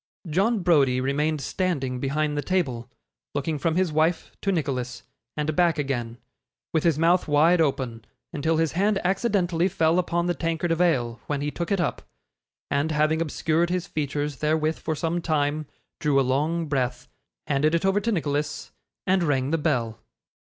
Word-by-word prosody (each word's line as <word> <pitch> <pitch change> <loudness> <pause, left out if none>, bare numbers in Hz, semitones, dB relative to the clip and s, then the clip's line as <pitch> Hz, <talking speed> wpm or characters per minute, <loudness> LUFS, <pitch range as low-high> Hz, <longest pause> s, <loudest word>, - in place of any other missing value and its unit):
John 195 +6 +1
Browdie 140 -8 +4
remained 145 +3 0
standing 135 -6 -1
behind 150 +3 -1
the 145 - 0
table, 130 -10 -1 0.5
looking 145 +1 -1
from 160 +3 0
his 185 -2 +1
wife 160 +2 +1
to 195 - +1
Nicholas, 130 -7 -2 0.3
and 150 0 -1
back 175 -2 +3
again, 120 -5 -2 0.6
with 160 - +2
his 165 -4 +3
mouth 170 +3 +3
wide 160 +4 +4
open, 125 -6 -1 0.3
until 160 +2 0
his 160 -1 +1
hand 200 +3 +1
accidentally 185 -3 +1
fell 165 -2 +2
upon 170 -1 0
the 175 - +1
tankard 165 0 -1
of 165 +1 +1
ale, 120 -9 +1
when 145 -1 -1
he 145 +1 -2
took 170 +4 -4
it 200 - +2
up, 175 - -1 0.7
and 140 +3 +1
having 155 +1 +2
obscured 165 +1 0
his 180 -1 -1
features 145 -4 -3
therewith 155 +2 0
for 160 - -2
some 165 +3 -1
time, 150 -2 0 0.3
drew 145 -3 +2
a 135 - +2
long 155 +6 0
breath, 125 -4 -2 0.4
handed 150 +2 +2
it 170 - 0
over 195 +1 +3
to 230 - 0
Nicholas, 145 -5 -2 0.3
and 185 0 +2
rang 140 -4 +1
the 165 - +2
bell. 120 -8 -1
155 Hz, 170 wpm, -25 LUFS, 140-170 Hz, 0.7 s, Browdie